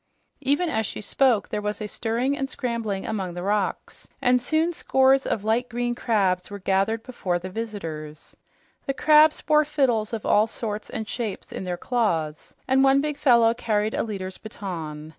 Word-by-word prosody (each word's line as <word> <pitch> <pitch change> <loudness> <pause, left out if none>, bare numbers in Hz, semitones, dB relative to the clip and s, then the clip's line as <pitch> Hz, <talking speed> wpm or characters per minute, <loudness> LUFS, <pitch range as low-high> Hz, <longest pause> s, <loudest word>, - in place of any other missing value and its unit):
Even 290 +6 +1
as 220 -9 -1
she - - -6
spoke, 235 +1 +2
there 210 - -2
was 210 0 -3
a 215 - -4
stirring 240 +6 -1
and 270 -1 -3
scrambling 230 -8 -3
among 190 -5 -3
the 175 - -5
rocks, 205 0 -2
and 250 0 +3
soon 315 +6 +1
scores 265 -3 +3
of 205 - -1
light 230 +3 +1
green 240 0 -1
crabs 195 -7 0
were 205 - -6
gathered 195 +4 0
before 195 -8 -2
the 185 +2 -7
visitors. 165 -9 -6 0.5
The 275 - -1
crabs 305 +1 +5
bore 305 0 +4
fiddles 265 -8 +1
of 225 -3 -4
all 210 +2 +4
sorts 215 -2 -5
and 220 -1 -5
shapes 220 -3 -4
in - - -5
their 180 -1 -3
claws, 170 -10 -1
and 265 +1 +4
one 270 0 +5
big 300 +1 -1
fellow 235 -5 +4
carried 215 -2 -1
a - - 0
leader's 190 -4 -5
baton. 165 -8 -6
220 Hz, 180 wpm, -24 LUFS, 195-260 Hz, 0.5 s, crabs